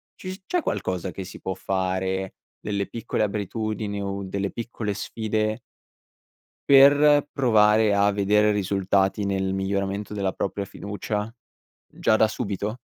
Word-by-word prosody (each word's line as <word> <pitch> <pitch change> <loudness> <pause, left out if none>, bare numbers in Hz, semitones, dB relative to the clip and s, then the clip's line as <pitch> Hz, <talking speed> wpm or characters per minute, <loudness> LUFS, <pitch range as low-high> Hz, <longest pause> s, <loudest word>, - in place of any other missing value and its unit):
ci 185 - -8
s 190 - -12
c'è 355 - 0
qualcosa 95 - -2
che 95 - -6
si 90 - -10
può 95 - -3
fare, 95 0 -2 0.3
delle 100 -2 -2
piccole 115 0 -2
abitudini 105 0 -3
o 100 0 -3
delle 100 +1 -3
piccole 115 -3 -4
sfide 110 +2 -2 1.1
per 145 +1 +7
provare 110 -4 +4
a 100 0 +4
vedere 105 +1 +3
risultati 95 0 +1
nel 95 -1 -1
miglioramento 100 +1 -2
della 100 -2 -1
propria 100 +1 -3
fiducia? 105 +2 -4 0.5
Già 110 - +1
da 110 - +5
subito? 105 0 -3
100 Hz, 130 wpm, -24 LUFS, 95-110 Hz, 1.1 s, per